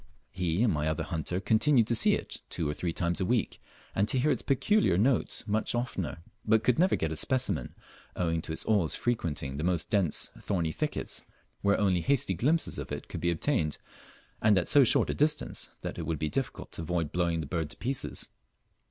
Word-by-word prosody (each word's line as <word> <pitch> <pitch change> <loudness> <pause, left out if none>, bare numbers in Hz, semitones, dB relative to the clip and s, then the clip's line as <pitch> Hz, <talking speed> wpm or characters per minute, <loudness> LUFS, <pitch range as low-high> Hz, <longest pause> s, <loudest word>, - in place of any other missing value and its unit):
He 90 +2 0
and 115 - +3
my 75 0 -1
other 80 -1 -1
hunter 85 +1 -3
continued 115 +5 +3
to 120 - 0
see 115 - +4
it - - -7
two 85 -4 -2
or 75 - -1
three 85 +3 -2
times 85 +3 -1
a - - +1
week, 120 +1 -1 0.3
and 100 +2 +1
to 130 - +3
hear 145 +4 +2
its - - 0
peculiar 140 - +2
note 120 +5 +1
much 110 +2 0
oftener, 95 - -3 0.2
but 110 0 +3
could 125 +2 +2
never 185 +2 +4
get 80 - -2
a - - -2
specimen, 125 - -1 0.4
owing 85 -2 0
to 80 - -7
its 80 - -3
always 100 -8 +3
frequenting 75 - -2
the 75 - -3
most 85 -1 0
dense 95 -7 +1
thorny 85 -5 -1
thickets, - - -2 0.4
where 100 0 +2
only 95 -4 +2
hasty 130 -3 +2
glimpses 145 - +1
of - - -7
it - - -6
could - - -6
be 85 - +1
obtained, 85 - 0 0.6
and 105 -3 +4
at 85 - +1
so 145 -2 +6
short 120 - +5
a - - -2
distance 150 +1 0
that - - -5
it - - -4
would 80 -2 -1
be 75 +1 -2
difficult - - -4
to - - -5
avoid 80 -2 -2
blowing 85 -2 0
the 80 - -3
bird 80 0 -3
to - - -11
pieces. 130 +1 -3
90 Hz, 210 wpm, -29 LUFS, 80-120 Hz, 0.6 s, so